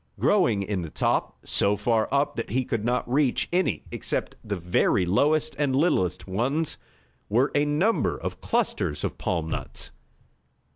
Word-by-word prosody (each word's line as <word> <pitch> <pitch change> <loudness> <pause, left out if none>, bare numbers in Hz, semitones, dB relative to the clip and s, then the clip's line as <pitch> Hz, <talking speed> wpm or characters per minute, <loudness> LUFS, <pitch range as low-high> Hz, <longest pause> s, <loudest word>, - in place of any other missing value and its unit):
Growing 120 - +3
in 100 -1 -2
the 85 - -5
top, - - 0
so 100 +1 +2
far 110 +1 +1
up 140 +1 +1
that 115 - -4
he 130 +3 0
could 115 -3 -2
not 125 +2 0
reach 130 +1 +1
any 185 +1 +1
except - - -3
the 105 -2 -3
very 90 +1 +2
lowest, 145 - +2
and 140 -3 +1
littlest, 95 - +1
ones, 135 +11 0 0.5
were 120 +7 +2
a 145 0 +3
number 155 +10 +1
of - - -6
clusters 95 - -1
of - - -3
palm 85 -2 -1
nuts. - - -3
120 Hz, 155 wpm, -26 LUFS, 100-145 Hz, 0.5 s, Growing